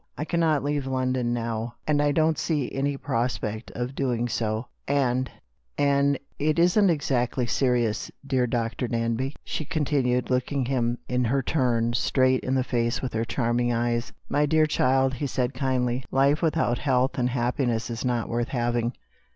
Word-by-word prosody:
" - - -44
I 150 - -2
cannot 160 -4 +1
leave 145 -1 -1
London 130 -2 0
now; 115 0 -3
and 150 -1 +2
I 145 0 +3
don't 155 +1 +2
see 150 -6 -1
any 140 +1 -1
prospect 115 -4 -2
of 125 +2 -3
doing 120 -3 -1
so. 110 0 -2 0.2
And 130 -2 +1 0.3
— 60 -3 -46
and 140 0 +3
— - - -40
it 155 - +1
isn't 180 +4 +4
exactly 130 -5 0
serious, 120 -1 0 0.2
dear 130 -3 +1
Dr. 120 +1 -1
Danby? 115 +4 -1
" - - -47
she - - -3
continued, 135 -5 0
looking 130 +1 0
him, 120 -2 0
in 125 0 0
her 135 +4 +1
turn, 120 -5 +1
straight 130 +1 +2
in 130 - 0
the 130 - +2
face 120 -1 -1
with 130 - -3
her 115 +1 0
charming 120 0 0
eyes. 120 0 -1 0.2
"My 150 +1 +2
dear 155 +1 +4
child," 135 -2 +2
he 140 +3 -2
said 125 0 -1
kindly, 125 -1 0
"life 140 +3 +3
without 160 -7 +1
health 130 -1 +1
and 125 0 +2
happiness 120 -1 -1
is 115 - -4
not 120 -3 0
worth 120 +1 -1
having. 120 -1 -1
125 Hz, 175 wpm, -26 LUFS, 120-140 Hz, 0.3 s, isn't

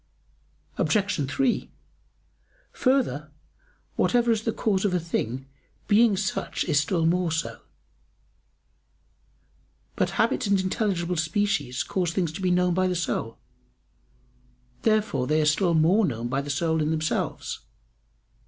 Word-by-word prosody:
Obj. 195 - +1
3: 260 - 0 1.0
Further, 240 - +1 0.7
"whatever 240 -1 +3
is 220 -2 +1
the 225 - +1
cause 200 -4 0
of 195 -3 +1
a - - +2
thing 135 -6 -3 0.4
being 215 -1 +4
such 190 -1 -2
is 150 -4 +2
still 165 +2 0
more 175 0 +1
so." 165 +1 -3 2.3
But - - +1
habits 230 0 +1
and 200 -1 +3
intelligible 185 -3 -1
species 160 -5 0
cause 180 -3 -1
things 175 -4 0
to 160 - -7
be 185 - +1
known 180 0 +2
by 185 +1 +2
the 180 - -1
soul. 115 -9 -2 1.4
Therefore 215 - +1
they 155 +1 +2
are 155 - +2
still 170 +3 +2
more 175 +8 +4
known 120 - -2
by 135 +2 0
the 145 - -8
soul 160 +2 0
in 150 - 0
themselves. 155 0 -2
180 Hz, 130 wpm, -25 LUFS, 155-205 Hz, 2.3 s, being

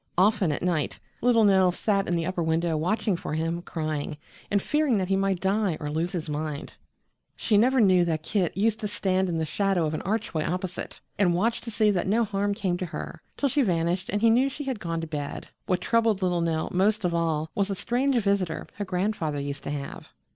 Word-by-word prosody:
Often 195 -2 +3
at 145 - -3
night 170 -5 0 0.2
little 235 -2 +4
Nell 190 -3 +5
sat 195 +1 0
at 175 - 0
the 165 -1 0
upper 185 0 -2
window, 165 0 +1
watching 195 +5 0
for 155 - -4
him, 165 +2 -1
crying, 155 -3 -3 0.3
and 200 - +3
fearing 295 +1 +1
that 185 -1 -1
he 195 - +3
might 195 -1 +1
die 195 -3 +1
or 150 -1 -4
lose 165 +3 -1
his 170 -3 -4
mind; 150 0 -4 0.6
she 215 - +1
never 255 +5 +4
knew 185 -5 +5
that 160 -2 -1
Kit 180 -2 -1
used 220 +2 +2
to 210 - -2
stand 190 -2 0
in 170 - -1
the 160 - 0
shadow 190 +1 +1
of 155 - -2
an 155 - -2
archway 195 -6 -1
opposite 180 +1 -4 0.2
and 180 -4 +3
watch 225 +6 +1
to 235 - -7
see 215 -1 +3
that 185 -2 -1
no 225 +4 +3
harm 200 -1 -1
came 185 -3 -1
to 185 - -3
her, 170 - -7 0.2
till 285 - +2
she 280 +2 +2
vanished 175 -3 0
and 205 +2 -1
he 230 - +6
knew 255 +4 +4
she 290 +2 -6
had 265 -5 -3
gone 165 -2 -3
to - - -3
bed. 150 -3 -5 0.2
What 185 -2 +1
troubled 225 -2 +2
little 175 -2 +1
Nell 160 -1 0
most 200 +2 +2
of 175 - +1
all 160 -2 0
was 200 0 0
a 195 - -1
strange 250 +7 0
visitor 200 -7 0
her 205 - -3
grandfather 180 -5 -1
used 140 0 -4
to - - -3
have. 140 -1 -6
185 Hz, 225 wpm, -26 LUFS, 165-210 Hz, 0.6 s, he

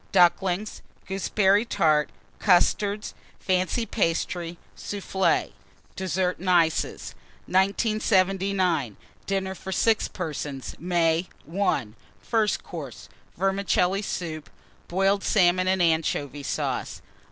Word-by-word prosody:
Ducklings. 185 +2 +2 0.2
Gooseberry 195 +1 +2
Tart. 155 - +2 0.3
Custards. 205 +2 +2 0.3
Fancy 185 +5 0
Pastry. 170 -3 -1 0.2
Soufflé. 195 -1 -1 0.4
DESSERT 185 -1 -1
AND 185 +1 -3
ICES. 165 -3 +1 0.3
1979. 190 - +1 0.3
DINNER 190 -1 -1
FOR 190 0 -8
6 220 +3 +2
PERSONS 150 -6 -5
(May). 170 0 +1 0.3
I. 195 - +1 0.3
FIRST 220 -3 0
COURSE. 140 -9 -8 0.3
Vermicelli 195 0 +1
Soup. 160 -6 -5 0.4
Boiled 195 +2 +1
Salmon 185 -2 +3
and 185 -1 +2
Anchovy 155 -3 0
Sauce. 140 - -3
185 Hz, 90 wpm, -25 LUFS, 165-195 Hz, 0.4 s, Salmon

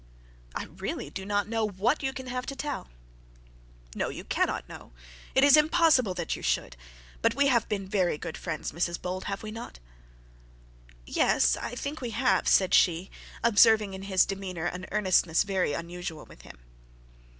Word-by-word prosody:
'I - - -2
really - - -4
do 190 0 -6
not 205 -1 0
know 225 0 -1
what 215 +7 0
you 265 -1 -1
can 260 0 -8
have 250 0 -4
to 275 - -4
tell.' 290 0 -4 1.1
'No - - -2
you - - -7
cannot - - -1
know. - - -12 0.4
It 265 - +5
is 285 0 +8
impossible 300 - +4
that 175 -2 -2
you - - -9
should. - - -1 0.5
But - - +2
we 280 0 +3
have 235 -4 +2
been 195 -2 -2
very 185 -5 +1
good 160 - -6
friends, 165 -3 -4
Mrs 170 +2 -2
Bold, 185 +1 -4
have 200 +1 -4
we 215 - -6
not?' 225 +2 -8 1.3
'Yes, - - +3
I 245 - -5
think 280 +4 -5
we 245 - -3
have,' 200 -7 +2
said 190 -2 +4
she, 175 +2 +3 0.3
observing 215 -2 +5
in 190 - -7
his 195 -1 +3
demeanour 190 -4 -5
an 180 +1 -4
earnestness 185 -5 +3
very 190 -6 0
unusual 170 0 -6
with - - -16
him. - - -13
195 Hz, 170 wpm, -28 LUFS, 180-240 Hz, 1.3 s, is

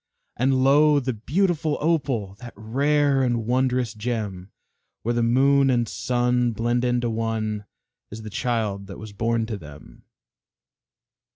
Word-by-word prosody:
And 130 +1 +2
lo! 145 +2 +5
the 130 -1 -2
beautiful 155 - 0
Opal 135 - 0
That 120 -2 -10
rare 140 +5 +1
and 120 -3 0
wondrous 125 -1 0
gem 105 -4 -4 0.5
Where 120 - 0
the 120 - 0
moon 135 +4 +4
and 120 -2 +1
sun 125 +1 0
blend 120 +2 0
into 120 -1 +1
one, 110 -2 -2 0.4
Is 110 +1 -9
the 110 - -8
child 105 -5 -2
that 95 - -9
was 105 -1 -10
born 115 +2 0
to 110 -2 -4
them. 75 -2 -14
120 Hz, 135 wpm, -24 LUFS, 110-130 Hz, 0.5 s, lo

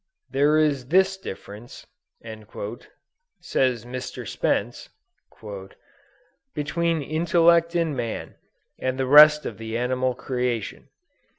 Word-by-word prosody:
"There 145 +3 +3
is 145 -5 +1
this 190 +5 +3
difference" 105 - -10 1.5
says 125 -4 0
Mr. 125 +1 -7
Spence, - - -2 1.7
"between 165 +1 -1
intellect 170 +2 +2
in 165 -4 0
man, 115 -3 -4 0.5
and 130 0 -2
the 135 - 0
rest 150 +2 +7
of - - -6
the 115 0 -4
animal 125 +1 -1
creation. 125 -4 -3
140 Hz, 95 wpm, -24 LUFS, 125-165 Hz, 1.7 s, rest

